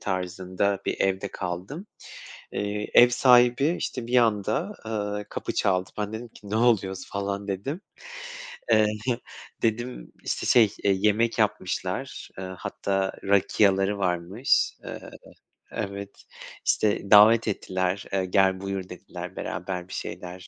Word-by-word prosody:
tarzında 95 Hz, +1 st, -1 dB
bir -, -, -2 dB
evde 95 Hz, +1 st, +1 dB
kaldım. 95 Hz, -, -5 dB, 0.7 s
Eee, 105 Hz, +1 st, -2 dB
ev 120 Hz, -, +8 dB
sahibi, 125 Hz, +5 st, +5 dB
işte, 125 Hz, -3 st, -4 dB
bir 125 Hz, +1 st, +2 dB
anda, 115 Hz, -, +1 dB
eee, 105 Hz, -2 st, -3 dB
kapı -, -, -4 dB
çaldı. 95 Hz, -1 st, +1 dB
Ben 105 Hz, 0 st, -3 dB
dedim 115 Hz, +2 st, -5 dB
ki, 105 Hz, -2 st, -14 dB
"Ne 105 Hz, -, -1 dB
oluyoruz?" 105 Hz, -5 st, +2 dB
falan 100 Hz, 0 st, -3 dB
dedim 100 Hz, -, -3 dB, 0.9 s
Eee, 110 Hz, -1 st, +6 dB, 0.8 s
dedim, 115 Hz, -, -2 dB
işte, -, -, -2 dB
şey, 120 Hz, -, +7 dB, 0.2 s
eee, 100 Hz, -, +5 dB
yemek 105 Hz, +3 st, +2 dB
yapmışlar, -, -, -2 dB
eee, 95 Hz, -, -4 dB
hatta 95 Hz, -1 st, -1 dB
rakia'ları 100 Hz, 0 st, +3 dB
varmış. 90 Hz, +6 st, +1 dB
Eee -, -, -8 dB, 0.7 s
Evet, 100 Hz, -2 st, -5 dB, 0.4 s
işte, 105 Hz, -2 st, +1 dB
davet 110 Hz, +2 st, +8 dB
ettiler. 95 Hz, -1 st, -1 dB
Eee, 95 Hz, -1 st, +1 dB
"Gel, 95 Hz, 0 st, +3 dB
buyur." 95 Hz, -1 st, -4 dB
dediler, -, -, -8 dB
beraber 90 Hz, 0 st, -4 dB
bir -, -, -10 dB
şeyler 90 Hz, 0 st, -6 dB
100 Hz, 125 wpm, -26 LUFS, 95-110 Hz, 0.9 s, ev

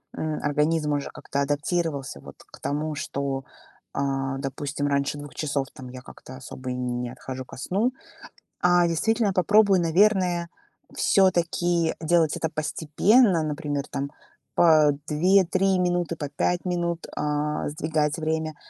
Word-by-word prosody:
м, 155 Hz, -1 st, -2 dB
организм 150 Hz, +1 st, +1 dB
уже 145 Hz, -1 st, -2 dB
как-то 140 Hz, -, -4 dB
адаптировался 145 Hz, -, -1 dB
вот -, -, -12 dB
к -, -, -16 dB
тому, 150 Hz, +2 st, -2 dB
что, 140 Hz, -2 st, -3 dB, 0.5 s
а, 135 Hz, -1 st, -1 dB
допустим, 145 Hz, +1 st, -3 dB
раньше 140 Hz, 0 st, 0 dB
2 145 Hz, 0 st, -9 dB
часов, 145 Hz, -3 st, -1 dB
там, 130 Hz, -1 st, -10 dB
я 130 Hz, 0 st, -9 dB
как-то 130 Hz, 0 st, -12 dB
особо 130 Hz, 0 st, -8 dB
и 125 Hz, -, -2 dB
не 125 Hz, -1 st, -3 dB
отхожу 130 Hz, 0 st, -7 dB
ко -, -, -12 dB
сну. 205 Hz, -, 0 dB, 0.7 s
А 175 Hz, -1 st, +5 dB
действительно 210 Hz, +6 st, +1 dB
попробую, 200 Hz, +1 st, +4 dB
наверное, 175 Hz, 0 st, +2 dB, 0.5 s
всё-таки 175 Hz, -3 st, +2 dB
делать 165 Hz, -1 st, +2 dB
это 160 Hz, -, -2 dB
постепенно, 165 Hz, -, +2 dB
например, 145 Hz, -2 st, -2 dB
там, 140 Hz, +1 st, -3 dB, 0.5 s
по 155 Hz, -3 st, +6 dB, 0.2 s
2-3 190 Hz, +4 st, +3 dB
минуты, 175 Hz, -2 st, 0 dB
по 145 Hz, -3 st, -5 dB
5 175 Hz, +5 st, -1 dB
минут, 170 Hz, -2 st, -2 dB
а, 150 Hz, 0 st, -1 dB
сдвигать 150 Hz, 0 st, -1 dB
время. 160 Hz, -1 st, -2 dB
155 Hz, 135 wpm, -25 LUFS, 140-175 Hz, 0.7 s, по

